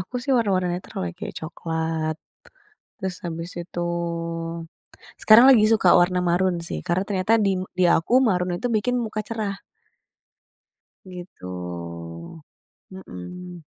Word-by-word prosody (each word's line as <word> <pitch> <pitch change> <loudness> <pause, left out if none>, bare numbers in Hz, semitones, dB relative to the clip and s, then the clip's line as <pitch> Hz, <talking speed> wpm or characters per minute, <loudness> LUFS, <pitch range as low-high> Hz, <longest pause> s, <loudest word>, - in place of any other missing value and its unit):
Aku 185 +7 -9
sih 275 +1 0
warna-warna 195 -6 +1
yang 175 - -1
netral - - -7
ya, - - -7
kayak - - -6
coklat, 160 -1 -3 0.8
terus 190 -1 -4
habis 165 +1 -5
itu 175 0 -6 1.4
sekarang 220 +3 +8
lagi 225 -5 +6
suka 215 -4 +3
warna 180 +1 +3
maroon 180 +1 +2
sih 170 - -4
karena 175 +2 +1
ternyata 200 +2 +2
di 190 -1 +1 0.2
di 185 - +4
aku 165 +9 0
maroon 180 -2 0
itu 245 - -2
bikin 230 +2 +1
muka 215 -1 -3
cerah. 210 -3 -4 1.4
GItu, 90 - -8 0.5
mhm. 180 - -9
180 Hz, 125 wpm, -24 LUFS, 160-200 Hz, 1.4 s, sekarang